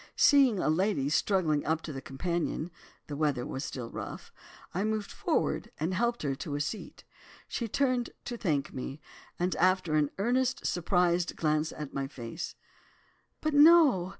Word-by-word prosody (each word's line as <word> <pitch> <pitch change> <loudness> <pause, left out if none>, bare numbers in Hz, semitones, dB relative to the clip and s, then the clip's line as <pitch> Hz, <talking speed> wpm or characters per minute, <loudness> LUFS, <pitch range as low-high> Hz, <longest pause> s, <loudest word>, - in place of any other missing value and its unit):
Seeing 275 -7 +5
a - - 0
lady 160 -3 +1
struggling 155 -2 +2
up 160 0 -1
the 140 -4 -6
companion 170 +4 -2 0.3
(the 145 - -6
weather 145 -4 0
was 135 - -4
still 120 -6 -5
rough), - - -7 0.4
I 190 - 0
moved 215 -1 -2
forward - - -1
and 165 +5 -1
helped 235 +3 0
her 140 -2 0
to 145 +2 -5
a - - -2
seat. 155 +9 -5 0.4
She 235 - -3
turned 255 0 +1 0.2
to 245 - -4
thank 155 -11 -1
me, 135 +3 -5 0.4
and 180 +1 0
after 185 -2 +2
an 150 -2 +3
earnest 255 +5 0
surprised 175 0 +1
glance 155 0 0
at 150 -2 -7
my 135 0 -2
face—'But, 155 - -8
no! 290 - +6
175 Hz, 150 wpm, -30 LUFS, 150-215 Hz, 0.4 s, no